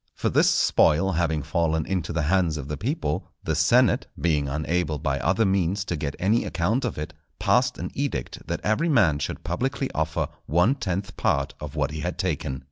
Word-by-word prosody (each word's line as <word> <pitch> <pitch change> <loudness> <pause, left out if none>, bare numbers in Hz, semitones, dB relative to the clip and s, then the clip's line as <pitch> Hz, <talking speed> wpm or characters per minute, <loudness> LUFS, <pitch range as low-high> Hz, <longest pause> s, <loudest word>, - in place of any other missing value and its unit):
For - - 0
this - - +4
spoil 95 +6 +3
having 80 -3 0
fallen 80 +1 0
into 90 -3 -2
the 85 -2 -1
hands 85 -1 +2
of 70 -2 -6
the 75 - -3
people, 130 - -2 0.2
the 80 - -1
senate, 115 +11 +3
being 75 -4 +1
unable 80 +2 -1
by 70 -2 -1
other 110 - +2
means 95 +1 +1
to 85 - -2
get 75 -2 -3
any 105 +5 +2
account 110 +10 0
of 120 - -3
it, 75 - -5 0.2
passed 125 0 +2
an - - -5
edict 135 - -4
that - - -3
every 130 +11 +1
man 90 - +4
should - - -4
publicly - - -2
offer - - -1 0.2
one 90 - +3
tenth 95 -7 -3
part 70 -1 0
of 75 0 -7
what 75 -1 0
he 80 - -5
had 85 +3 -3
taken. 80 -7 -2
85 Hz, 195 wpm, -25 LUFS, 75-100 Hz, 0.2 s, this